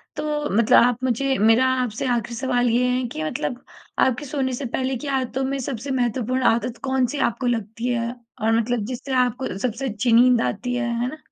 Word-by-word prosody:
तो - - -4 0.3
मतलब 235 +2 +5
आप 245 +1 +1
मुझे 265 +2 +1
मेरा 225 +4 +5 0.2
आपसे 225 +1 -3
आख़िरी 240 -1 -1
सवाल 245 -1 +1
ये 245 +2 +2
है 250 +1 0
कि 155 - -4
मतलब 155 - -3 0.4
आपके 260 +3 +2
सोने 260 -2 -2
से 270 +3 -4
पहले 260 +2 -2
की 290 - -7
आदतों 265 -1 -1
में 275 +1 -1
सबसे 260 0 -4
महत्वपूर्ण 255 0 0
आदत 235 +1 -3
कौन-सी 265 0 0
आपको 245 +3 -4
लगती 230 0 -2
है? 235 -1 -1 0.3
और 220 +1 +2
मतलब 230 -1 -1
जिससे 260 +3 -5
आपको 245 -4 -4
सबसे 250 +5 -2
अच्छी 220 +3 -1
नींद 245 +1 +6
आती 245 - -2
है? 235 -1 -1
है 245 - 0
ना। 310 - -8
245 Hz, 195 wpm, -23 LUFS, 230-260 Hz, 0.4 s, नींद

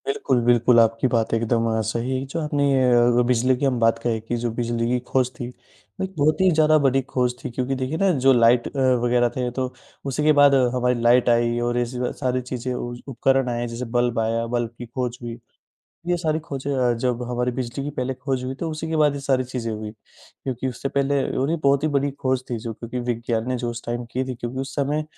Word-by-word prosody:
बिल्कुल, 415 - +1
बिल्कुल, 120 0 +5
आपकी 115 +2 +3
बात 115 -3 0
एकदम 115 0 +1 0.2
सही 120 +4 -1
है 135 - -5
जो 160 +5 -4
आपने 150 -2 0
ए 130 - +3
अगर 120 0 +4
बिजली 125 +2 +3
की 140 - -1
हम 130 -3 +1
बात 115 0 +3
कहें 115 -2 0
कि 115 +2 -3
जो 120 - +1
बिजली 115 0 -1
की 125 +1 +1
खोज 130 -2 +2
थी, 120 - -4 0.6
एक 190 0 -5
बहुत 155 +4 +2
ही 190 - +5
ज़्यादा 155 -1 +4
बड़ी 135 0 +3
खोज 125 -1 +1
थी - - -3
क्योंकि 130 +2 -2
देखिए 130 +5 -2
ना 195 +2 +3
जो 135 - +7
लाइट 120 0 +4
अ, 140 - -5 0.2
वग़ैरह 120 0 +3
थे 125 -1 -1
तो, 130 0 -3 0.3
उसी 140 +2 -1
के 155 - +5
बाद 145 -1 +7 0.2
हमारी 125 -1 +1
लाइट 120 +1 +4
आई 120 0 +2
और 120 0 -1
ऐसे 120 +1 -3
ही - - -2
सारी 130 -2 -1
चीजें 125 0 -4
उज़ 120 0 -5
उपकरण 135 0 +1
आए 120 0 -2
जैसे 120 +2 -5
बल्ब 120 -1 +1
आया 115 +1 0
बल्ब 120 -1 0
की 120 - -7
खोज 120 0 -4
हुई। 120 -1 -6 0.7
ये 175 0 +1
सारी 160 -2 0
खोजें 140 -3 -5
अ, 125 -2 +2
जब 125 +1 -1
हमारी 125 0 0
बिजली 125 +2 -4
की 145 - -3
पहले 130 -2 -3
खोज 130 -1 -3
हुई 130 +1 -3
तो 160 +4 -4
उसी 155 +1 -5
के 160 - -1
बाद 150 -2 +3
ये 140 - -5
सारी 135 -2 +1
चीज़ें 125 -3 -4
हुई, 105 0 -5
क्योंकि 125 +4 -7
उससे 130 +2 -4
पहले 140 0 +1 0.2
उन्हें 150 +6 0
बहुत 140 0 +3
ही 155 - +2
बड़ी 140 +1 -1 0.2
खोज 130 0 +1
थी 120 - -2
जो 115 +1 -5
क्योंकि 120 +3 -5
विज्ञान 115 0 -2
ने 130 - 0
जो 120 -1 -3
उस 120 0 -7
टाइम 120 +1 -3
की 130 +1 -1
थी 130 -1 -4
क्योंकि 120 +2 -6
उस 135 +1 -6
समय 145 +2 0
125 Hz, 235 wpm, -23 LUFS, 120-135 Hz, 0.7 s, जो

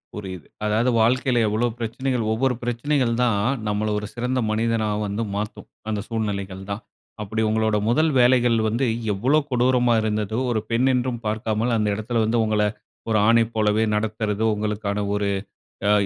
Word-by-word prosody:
புரியுது, 95 -6 -7 0.2
அதாது 110 +4 +2
வாழ்க்கையில 125 +1 +2
எவ்வளோ 110 +3 +1
பிரச்சனைகள் 120 +2 -2
ஒவ்வொரு 125 +3 +1
பிரச்சனைகள் 120 +1 0
தான், 115 -5 +2 0.3
நம்மள 105 +1 0
ஒரு 105 - -6
சிறந்த 125 +1 -1
மனிதனா 110 0 0 0.2
வந்து 100 +3 -2
மாத்தும், 105 +2 -5 0.2
அந்த 105 -1 -1
சூழ்நிலைகள் 100 -4 -3
தான். 100 +2 -4 0.4
அப்படி 110 +2 -2
உங்களுடைய 110 -1 +1
முதல் 155 +6 +3
வேலைகள் 120 -1 +4
வந்து 115 +5 0 0.3
எவ்வளோ 130 +10 +2
கொடூரமா 125 -1 +3
இருந்ததோ! 110 0 -1
ஒரு 110 - +1
பெண் 120 +3 +2
என்றும் 125 -1 -1
பார்க்காமல், 110 +2 -1
அந்த 105 -1 +1
இடத்தில 115 +2 -1
வந்து 115 +2 +1
உங்களை, 105 -1 +2 0.4
ஒரு 110 - +3
ஆணை 115 0 +5
போலவே 110 0 +2
நடத்துறது 105 0 -1
உங்களுக்கான 105 -1 -2
ஒரு 105 0 0 0.6
ஆ, - - +4
110 Hz, 150 wpm, -23 LUFS, 105-120 Hz, 0.6 s, ஆணை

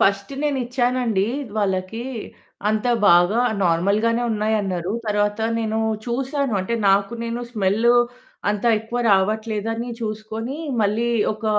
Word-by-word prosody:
First 200 +5 +1
నేనిచ్చానండి 250 -6 0 0.3
వాళ్ళకి 195 +3 -1 0.6
అంత 215 +2 0 0.2
బాగా 175 +7 +5 0.2
నార్మల్‌గానే 205 +8 +2
ఉన్నాయన్నారు. 205 -4 -1
తర్వాత 205 0 +1 0.2
నేను 220 -1 -1 0.3
చూశాను. 270 +1 -1
అంటే 190 +5 -2 0.2
నాకు 195 +3 +2
నేను 235 +1 -3
స్మెల్ 210 +2 +1 0.6
అంత 210 +1 -3
ఎక్కువ 225 +3 -5
రావట్లేదని 220 +4 0
చూసుకొని 220 +4 -4 0.2
మళ్ళీ 215 +3 +1 0.2
ఒక 215 +1 -10
215 Hz, 105 wpm, -22 LUFS, 200-235 Hz, 0.6 s, బాగా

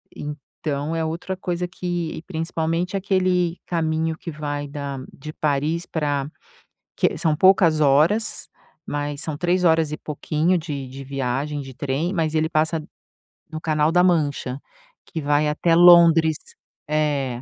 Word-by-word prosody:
então 150 +1 -5
é 165 -1 -1
outra 170 +4 -4
coisa 180 -1 -2
que 175 -3 -4
principalmente 165 +2 -2
aquele 185 -3 +1
caminho 160 -1 -1
que 170 - -8
vai 145 -1 -4
da 140 -1 -5
de 155 +3 -9
Paris 155 +4 -1
pra 145 -3 -2 0.7
que - - +1
são 160 -2 +1
poucas 170 -2 +4
horas, 155 +10 +2 0.4
mas 145 0 -3
são 155 -3 -4
3 180 +2 +1
horas 160 -2 +3
e 150 - -3
pouquinho 155 +4 0
de 145 -5 -5
de 135 +2 -9
viagem 135 +2 -2
de 135 -1 -9
trem, 145 +8 -2
mas 160 -4 0
ele 160 0 +1
passa 160 0 +1 0.7
no 155 0 -6
canal 155 -1 +1
da 180 +1 +4
mancha 145 -7 0 0.5
que 160 - -5
vai 145 +1 +2
até 165 +3 +2
Londres, 170 -2 +7 0.5
eh, 145 -5 0
155 Hz, 140 wpm, -22 LUFS, 145-170 Hz, 0.7 s, Londres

